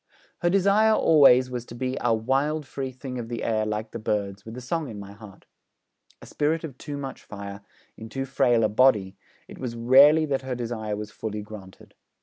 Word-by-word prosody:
Her 175 Hz, -, +1 dB
desire, 200 Hz, +4 st, +4 dB
always, 135 Hz, -7 st, +5 dB
was 125 Hz, -2 st, -4 dB
to 120 Hz, -, -10 dB
be 130 Hz, +1 st, -3 dB
'a 120 Hz, -, +1 dB
wild 135 Hz, +7 st, 0 dB
free 135 Hz, -1 st, -5 dB
thing 130 Hz, 0 st, -7 dB
of 115 Hz, -1 st, -6 dB
the 120 Hz, -1 st, -4 dB
air 110 Hz, -1 st, 0 dB
like 110 Hz, +1 st, -4 dB
the 115 Hz, -, -6 dB
birds, 100 Hz, -2 st, -2 dB
with 110 Hz, +2 st, -9 dB
a -, -, -4 dB
song 150 Hz, +3 st, -3 dB
in 105 Hz, -3 st, -8 dB
my 100 Hz, 0 st, -9 dB
heart.' 100 Hz, -1 st, -14 dB, 0.8 s
A -, -, -10 dB
spirit 155 Hz, +3 st, -1 dB
of 150 Hz, -6 st, -7 dB
too 145 Hz, -1 st, -6 dB
much 135 Hz, -1 st, -7 dB
fire 100 Hz, -1 st, -9 dB, 0.3 s
in 110 Hz, 0 st, -10 dB
too 135 Hz, +2 st, -4 dB
frail 125 Hz, -4 st, +2 dB
a -, -, +4 dB
body, 105 Hz, -4 st, +3 dB, 0.3 s
it -, -, -12 dB
was 120 Hz, -3 st, -5 dB
rarely 140 Hz, +7 st, +6 dB
that 140 Hz, -3 st, -1 dB
her 130 Hz, -1 st, -4 dB
desire 115 Hz, -3 st, -4 dB
was 105 Hz, +1 st, -7 dB
fully 105 Hz, -2 st, -5 dB
granted. 100 Hz, -3 st, -12 dB
125 Hz, 205 wpm, -25 LUFS, 110-135 Hz, 0.8 s, rarely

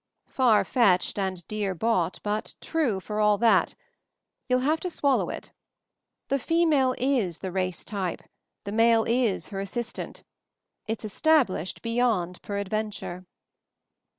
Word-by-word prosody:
"Far 240 Hz, -5 st, +3 dB
fetched 205 Hz, -5 st, +2 dB
and 185 Hz, -3 st, -3 dB
dear 205 Hz, -3 st, -2 dB
bought, 185 Hz, -2 st, 0 dB
but 210 Hz, +1 st, -2 dB
true 285 Hz, -12 st, 0 dB
for 210 Hz, +3 st, -4 dB
all 210 Hz, -1 st, +4 dB
that. 230 Hz, +1 st, +3 dB, 0.7 s
You'll 255 Hz, 0 st, +3 dB
have 310 Hz, +5 st, +1 dB
to 365 Hz, -, -3 dB
swallow 280 Hz, -5 st, +1 dB
it. -, -, -7 dB, 0.8 s
The 275 Hz, -, +1 dB
female 300 Hz, -5 st, +2 dB
is 240 Hz, -, 0 dB
the 190 Hz, -, -5 dB
race 185 Hz, -2 st, -2 dB
type; 195 Hz, -4 st, -3 dB, 0.4 s
the 200 Hz, -, -5 dB
male 225 Hz, +1 st, +4 dB
is 235 Hz, -4 st, +1 dB
her 195 Hz, -, -5 dB
as 195 Hz, 0 st, -4 dB
sistant. 235 Hz, +2 st, -5 dB, 0.6 s
It's 225 Hz, 0 st, -3 dB
established 220 Hz, -, +1 dB
beyond 230 Hz, -7 st, 0 dB
peradven 205 Hz, +1 st, -2 dB
ture." 180 Hz, 0 st, -7 dB
215 Hz, 135 wpm, -26 LUFS, 190-250 Hz, 0.8 s, all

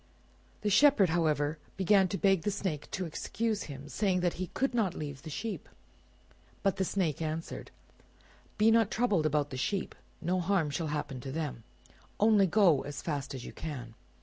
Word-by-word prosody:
The 210 Hz, -, 0 dB
Shepherd, 230 Hz, -, +6 dB
however, 155 Hz, -2 st, +1 dB, 0.2 s
began 195 Hz, 0 st, +4 dB
to 195 Hz, -, -3 dB
beg 195 Hz, -3 st, +3 dB
the 210 Hz, -, 0 dB
Snake 190 Hz, -7 st, -3 dB
to 185 Hz, -, -3 dB
excuse 215 Hz, +6 st, -2 dB
him, 140 Hz, 0 st, -8 dB
saying 185 Hz, +2 st, +1 dB
that 175 Hz, -1 st, +1 dB
he 185 Hz, -, -1 dB
could 270 Hz, -1 st, +1 dB
not 215 Hz, -7 st, +1 dB
leave 145 Hz, -3 st, -6 dB
the 160 Hz, -, -8 dB
sheep; 210 Hz, +8 st, -5 dB, 0.9 s
but 195 Hz, -1 st, +2 dB
the 190 Hz, -, +1 dB
Snake 170 Hz, -6 st, -1 dB
answered— 160 Hz, +1 st, -4 dB, 0.9 s
"Be 215 Hz, +1 st, +5 dB
not 225 Hz, -2 st, +4 dB
troubled 205 Hz, -10 st, +2 dB
about 145 Hz, -1 st, 0 dB
the 130 Hz, -, -4 dB
sheep; 195 Hz, +8 st, -1 dB, 0.3 s
no 180 Hz, +2 st, 0 dB
harm 175 Hz, -4 st, +1 dB
shall 160 Hz, +2 st, -2 dB
happen 150 Hz, -3 st, -3 dB
to 135 Hz, +2 st, -6 dB
them; 145 Hz, -6 st, -4 dB, 0.6 s
only 210 Hz, -2 st, +5 dB
go 175 Hz, -7 st, +4 dB
as 140 Hz, -2 st, -6 dB
fast 145 Hz, -4 st, -3 dB
as 130 Hz, -, -7 dB
you -, -, -8 dB
can." 130 Hz, -7 st, -6 dB
175 Hz, 175 wpm, -31 LUFS, 150-200 Hz, 0.9 s, Shepherd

